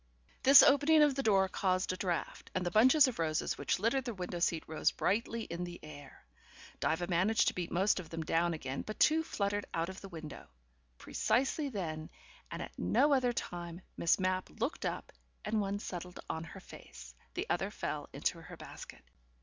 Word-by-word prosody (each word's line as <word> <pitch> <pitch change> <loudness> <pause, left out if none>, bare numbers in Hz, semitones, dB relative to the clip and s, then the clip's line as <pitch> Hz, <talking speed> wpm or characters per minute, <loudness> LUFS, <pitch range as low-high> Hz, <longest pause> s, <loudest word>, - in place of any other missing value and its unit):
This 275 +1 +9
opening 290 +2 +6
of 295 -2 +4
the 275 - -1
door 195 -6 +3
caused 185 -1 0
a - - -3
draught, 180 -2 -3
and 185 -1 0
the 175 - -1
bunches 260 - +6
of 250 - -4
roses 155 -2 0
which - - 0
littered 230 +7 +1
the 240 -3 -5
window 180 -1 -4
seat 165 -1 +1
rose 155 - +1
brightly 230 +3 -1
in 170 -2 -5
the 175 -1 -7
air. 145 - -12 0.5
Diva 160 +2 0
managed 185 +5 +2
to - - -7
beat 175 -2 -4
most 190 +3 +2
of 175 - -8
them 165 -1 -4
down 165 +1 +1
again, 135 -3 -4
but 215 - -7
two 315 +1 +5
fluttered 205 -9 -2
out 165 +1 -1
of 190 - -9
the 195 - -9
window. 160 -4 -9 0.5
Precisely 275 - 0
then, 160 -8 -4 0.4
and - - -5
at - - -9
no 295 0 +3
other 255 -2 +3
time, 175 -6 -5 0.2
Miss 170 - +3
Mapp 185 0 0
looked 250 +8 -1
up, - - -5 0.3
and 215 0 +1
one 200 0 -2
settled 180 -3 -7
on 160 0 -4
her 160 - -10
face, 65 -1 -12 0.2
the - - -2
other - - 0
fell - - -5
into - - -2
her - - -11
basket. - - -11
185 Hz, 190 wpm, -33 LUFS, 170-230 Hz, 0.5 s, This